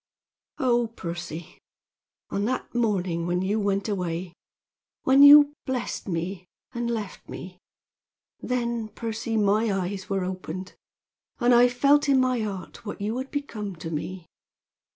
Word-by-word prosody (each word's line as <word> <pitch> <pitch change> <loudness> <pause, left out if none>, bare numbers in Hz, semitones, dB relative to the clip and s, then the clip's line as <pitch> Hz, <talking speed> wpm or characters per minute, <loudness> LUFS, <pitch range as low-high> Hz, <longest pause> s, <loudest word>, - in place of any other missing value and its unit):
"Oh, 240 -2 +2
Percy! 170 -6 -7 0.7
On 200 +1 0
that 255 +3 -3
morning 185 -8 0
when 175 +1 0
you 205 +3 0
went 200 0 0
away 180 -3 -3 0.7
when 265 +1 +5
you 290 0 +9
blessed 255 -4 -3
me 180 +1 -3 0.3
and 240 0 -2
left 215 -5 -5
me 180 0 -8 0.8
then, 235 -2 -2
Percy, 225 0 -3
my 210 +1 +2
eyes 190 0 -3
were 195 -1 0
opened, 185 0 -5 0.7
and 245 -1 +4
I 240 +1 +7
felt 280 +4 +3
in 270 -1 +5
my 255 -1 +2
heart 200 -4 -5
what 210 - -6
you 210 +3 -2
had 265 +1 -5
become 215 -9 -4
to 165 0 -7
me. 175 +3 -5
210 Hz, 135 wpm, -26 LUFS, 185-240 Hz, 0.8 s, you